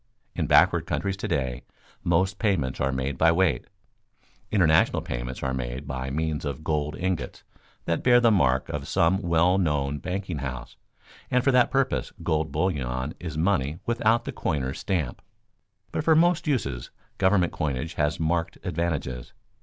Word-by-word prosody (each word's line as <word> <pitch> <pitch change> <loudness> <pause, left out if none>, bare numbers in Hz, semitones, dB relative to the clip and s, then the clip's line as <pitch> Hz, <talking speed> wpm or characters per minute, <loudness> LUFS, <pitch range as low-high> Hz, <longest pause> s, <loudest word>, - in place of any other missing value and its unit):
In - - -2
backward - - +4
countries 100 -1 -1
to - - -4
day 65 -2 -1 0.4
most 95 +3 +1
payments 80 - 0
are 65 - +1
made 65 +1 -3
by 80 0 +5
weight. 85 -6 +1 0.8
International 80 -6 +3
payments - - -5
are 65 -1 -1
made 65 +2 -4
by 65 -2 -4
means 80 +2 -2
of 70 0 -4
gold 75 -1 -1
ingots 90 -8 -3 0.4
that 85 - 0
bear 120 -1 +6
the 120 -2 +4
mark 65 -10 +2
of - - -4
some 95 +4 +2
well 85 +1 +3
known 75 -4 0
banking 90 0 -4
house, 65 -3 -6 0.5
and 125 0 +2
for 135 - +4
that 125 -1 +4
purpose 135 -1 0
gold 80 -2 0
bullion 70 -5 -1
is 80 -3 -6
money 80 -4 +1
without 115 0 +2
the - - -3
coiner's 65 -2 -2
stamp. 80 -10 -2 0.7
But - - -2
for 160 0 +4
most 170 0 +3
uses 70 - -1 0.3
government 95 -2 +3
coinage 75 +1 -2
has 75 0 0
marked 85 +1 -1
advantages. 80 -8 -3
80 Hz, 155 wpm, -26 LUFS, 65-95 Hz, 0.8 s, bear